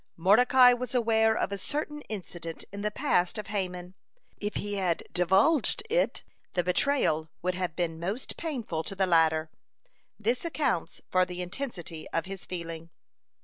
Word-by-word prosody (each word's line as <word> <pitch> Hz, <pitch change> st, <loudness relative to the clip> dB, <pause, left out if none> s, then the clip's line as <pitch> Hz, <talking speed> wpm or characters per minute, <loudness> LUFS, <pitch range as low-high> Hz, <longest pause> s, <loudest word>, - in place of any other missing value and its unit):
Mordecai 245 Hz, +8 st, +6 dB
was 250 Hz, 0 st, -4 dB
aware 220 Hz, -2 st, +3 dB
of -, -, -1 dB
a 200 Hz, -, -3 dB
certain 295 Hz, +5 st, -3 dB
incident 175 Hz, -5 st, -6 dB
in 200 Hz, 0 st, -6 dB
the 210 Hz, -, 0 dB
past 210 Hz, -7 st, +1 dB
of 210 Hz, -, -4 dB
Haman. 180 Hz, -3 st, -3 dB, 0.4 s
If 210 Hz, 0 st, -4 dB
he 205 Hz, 0 st, -3 dB
had 180 Hz, -4 st, 0 dB
divulged 200 Hz, -, +3 dB
it, -, -, +1 dB, 0.3 s
the 180 Hz, -, +1 dB
betrayal 180 Hz, -, +1 dB
would 185 Hz, 0 st, +1 dB
have 180 Hz, -3 st, -3 dB
been 165 Hz, -2 st, -2 dB
most 195 Hz, +9 st, -3 dB
painful 235 Hz, -, -3 dB
to 195 Hz, -, -3 dB
the 190 Hz, 0 st, +2 dB
latter. 160 Hz, -2 st, +3 dB, 0.7 s
This 235 Hz, +4 st, 0 dB
accounts 300 Hz, -, -1 dB
for 185 Hz, 0 st, +4 dB
the 180 Hz, 0 st, -4 dB
intensity 175 Hz, -, -6 dB
of 165 Hz, -, -1 dB
his 190 Hz, -1 st, -7 dB
feeling. 165 Hz, -2 st, -5 dB
190 Hz, 155 wpm, -29 LUFS, 175-235 Hz, 0.7 s, Mordecai